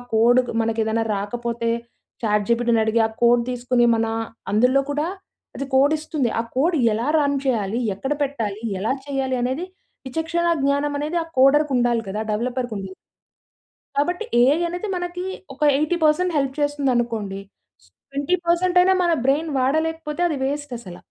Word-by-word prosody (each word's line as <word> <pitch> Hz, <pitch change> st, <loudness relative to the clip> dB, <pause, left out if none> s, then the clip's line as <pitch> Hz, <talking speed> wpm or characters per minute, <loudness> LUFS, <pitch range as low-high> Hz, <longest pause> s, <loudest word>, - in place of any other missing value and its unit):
కోడుకు 245 Hz, +3 st, +4 dB
మనకేదన్నా 225 Hz, 0 st, 0 dB
రాకపోతే 230 Hz, +3 st, -3 dB, 0.5 s
చాట్‌జీపిటీని 225 Hz, +2 st, +2 dB
అడిగి, 225 Hz, +1 st, +1 dB
ఆ -, -, -11 dB
కోడ్ 235 Hz, 0 st, +5 dB
తీసుకొని 245 Hz, 0 st, +1 dB
మనా 225 Hz, 0 st, 0 dB, 0.4 s
అందులో 250 Hz, +5 st, +4 dB
కూడా, 295 Hz, +3 st, -1 dB, 0.5 s
అది 275 Hz, -, -3 dB
కోడిస్తుంది. 290 Hz, -1 st, +2 dB
ఆ -, -, +3 dB
కోడ్ 325 Hz, +7 st, +2 dB, 0.2 s
ఎలా 225 Hz, +3 st, -2 dB
రన్ 285 Hz, -1 st, +1 dB
చేయాలి? 220 Hz, -4 st, 0 dB, 0.2 s
ఎక్కడ 270 Hz, +8 st, -2 dB
పెట్టాలి? 225 Hz, -7 st, -3 dB, 0.2 s
ఎలా 215 Hz, +6 st, 0 dB, 0.2 s
చేయాలి 270 Hz, -2 st, -1 dB
అనేది, 260 Hz, +8 st, -1 dB, 0.4 s
విచక్షణ 330 Hz, +4 st, -1 dB, 0.2 s
జ్ఞానం 285 Hz, +1 st, +1 dB
అనేది 305 Hz, +4 st, -2 dB
ఆ -, -, -12 dB
కోడర్‌కుండాలి 260 Hz, -4 st, +4 dB
గదా! 215 Hz, +3 st, -3 dB
డెవలపర్‌‌కుండదు. 225 Hz, -5 st, -3 dB, 1.0 s
కాబట్టి 355 Hz, +8 st, 0 dB, 0.2 s
ఏఐ 265 Hz, +4 st, +5 dB
అనేది 355 Hz, +5 st, -4 dB
మనకీ, 355 Hz, 0 st, -4 dB, 0.3 s
ఒక 275 Hz, -, -19 dB, 0.2 s
80% 320 Hz, +2 st, +1 dB
హెల్ప్ 270 Hz, -1 st, 0 dB
చేస్తుందనుకోండీ, 240 Hz, -8 st, -1 dB, 0.7 s
20 285 Hz, +6 st, 0 dB
పర్సెంటయినా 360 Hz, +2 st, +4 dB
మన 345 Hz, -1 st, +3 dB
బ్రెయిన్ 300 Hz, +4 st, +2 dB
వాడలేకపోతే 315 Hz, +4 st, -1 dB
అది 315 Hz, -, -2 dB
వేస్టసల. 250 Hz, -10 st, -5 dB
265 Hz, 130 wpm, -22 LUFS, 235-305 Hz, 1.0 s, కోడ్